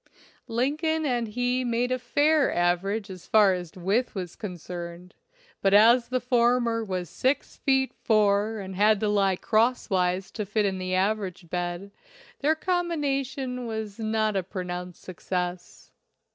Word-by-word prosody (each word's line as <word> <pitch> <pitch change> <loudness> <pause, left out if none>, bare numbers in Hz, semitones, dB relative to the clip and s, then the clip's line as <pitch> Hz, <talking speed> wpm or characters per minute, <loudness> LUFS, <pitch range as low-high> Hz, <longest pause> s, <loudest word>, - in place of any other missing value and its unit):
Lin 255 +5 0
coln 320 0 0
and 240 -4 0
he 245 +3 0
made 240 +1 0
a 255 - 0
fair 290 +4 +2
average 185 +4 0
as 185 -2 -11
far 210 -3 +5
as 175 -3 -5
width 200 +8 0
was 180 -3 -5
concerned, 180 -2 -7 0.5
but 195 0 +4
as 235 +3 +6
the 255 0 0
former 240 -2 +2
was 185 -4 -3
six 260 - -1
feet 265 -1 +1
four 215 0 +2
and 190 -2 -6
had 210 +2 +4
to 215 - +1
lie 200 -2 +2
crosswise 195 -5 +1
to 215 - -4
fit 210 +1 0
in 190 -1 -1
the 185 0 -2
average 190 -3 -1
bed, 175 +2 -3 0.5
their 305 +3 +2
combination 275 -8 -2
was 220 -2 -5
not 215 -1 0
a 195 - +2
pronounced 180 -1 -6
success. 180 0 -5
215 Hz, 145 wpm, -26 LUFS, 185-245 Hz, 0.5 s, as